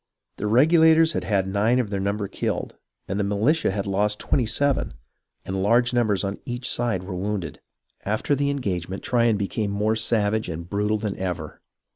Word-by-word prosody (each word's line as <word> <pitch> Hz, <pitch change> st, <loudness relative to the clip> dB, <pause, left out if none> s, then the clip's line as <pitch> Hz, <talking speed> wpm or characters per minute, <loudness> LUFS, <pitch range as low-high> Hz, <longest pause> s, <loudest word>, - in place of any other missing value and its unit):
The 105 Hz, -, -2 dB
Regulators 160 Hz, +6 st, +5 dB
had -, -, -2 dB
had 100 Hz, -3 st, +1 dB
nine 105 Hz, +5 st, +1 dB
of 120 Hz, -5 st, -1 dB
their 100 Hz, -, -1 dB
number 100 Hz, +1 st, -1 dB
killed, -, -, -3 dB, 0.3 s
and 100 Hz, +2 st, -2 dB
the -, -, +1 dB
militia 110 Hz, +11 st, +1 dB
had 100 Hz, 0 st, -2 dB
lost 105 Hz, +2 st, 0 dB
twenty 125 Hz, -4 st, 0 dB
seven, 140 Hz, +4 st, 0 dB, 0.5 s
and 95 Hz, +1 st, -2 dB
large 120 Hz, +5 st, +3 dB
numbers 110 Hz, -5 st, +1 dB
on 100 Hz, 0 st, -3 dB
each 120 Hz, 0 st, -4 dB
side 115 Hz, -7 st, 0 dB
were 95 Hz, 0 st, -6 dB
wounded. 95 Hz, -4 st, -3 dB, 0.4 s
After 110 Hz, +7 st, 0 dB
the 140 Hz, 0 st, +1 dB
engagement 95 Hz, -9 st, -3 dB
Tryon 115 Hz, -3 st, +2 dB
became 100 Hz, +1 st, -2 dB
more 105 Hz, +2 st, 0 dB
savage 110 Hz, -2 st, 0 dB
and 85 Hz, +1 st, -6 dB
brutal 105 Hz, +2 st, 0 dB
than 105 Hz, -2 st, -3 dB
ever. 90 Hz, -2 st, -5 dB
105 Hz, 175 wpm, -24 LUFS, 100-120 Hz, 0.5 s, Regulators